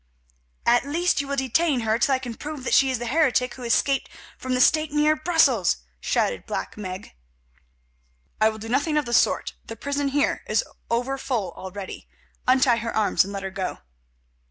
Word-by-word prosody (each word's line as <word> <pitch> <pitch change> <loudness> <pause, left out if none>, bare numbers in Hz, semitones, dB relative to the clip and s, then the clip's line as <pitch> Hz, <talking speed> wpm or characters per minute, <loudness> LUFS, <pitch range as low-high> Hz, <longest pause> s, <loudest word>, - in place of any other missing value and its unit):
"At 240 +1 +4
least 335 +1 +1
you 280 - -7
will 280 - -2
detain 265 +1 +1
her 220 0 +1
till 275 0 +3
I - - +1
can 250 -2 -6
prove 295 +2 -7
that - - -2
she 270 - +5
is 260 - 0
the 240 - -5
heretic 255 -2 +2
who 260 - -12
escaped 270 +3 +1 0.3
from 255 0 -3
the - - 0
stake 310 +3 +4
near 300 +1 +3
Brussels," 305 - +3 0.2
shouted - - -1
Black - - -4
Meg. 190 -2 -7 1.3
"I 220 - +6
will 220 - -6
do 220 +1 -8
nothing 285 +6 +1
of 300 - +1
the 240 - -4
sort; - - +2
the 225 - -8
prison 280 +4 -2
here 285 +1 +1
is - - +2 0.3
over 245 +4 -1
full 225 -10 -2
already. 190 +2 -8 0.4
Untie 255 -2 +4
her 230 0 -4
arms 215 -3 +3
and 195 - -7
let 195 -1 -5
her 195 - -4
go." 190 -1 -4
255 Hz, 190 wpm, -24 LUFS, 225-285 Hz, 1.3 s, I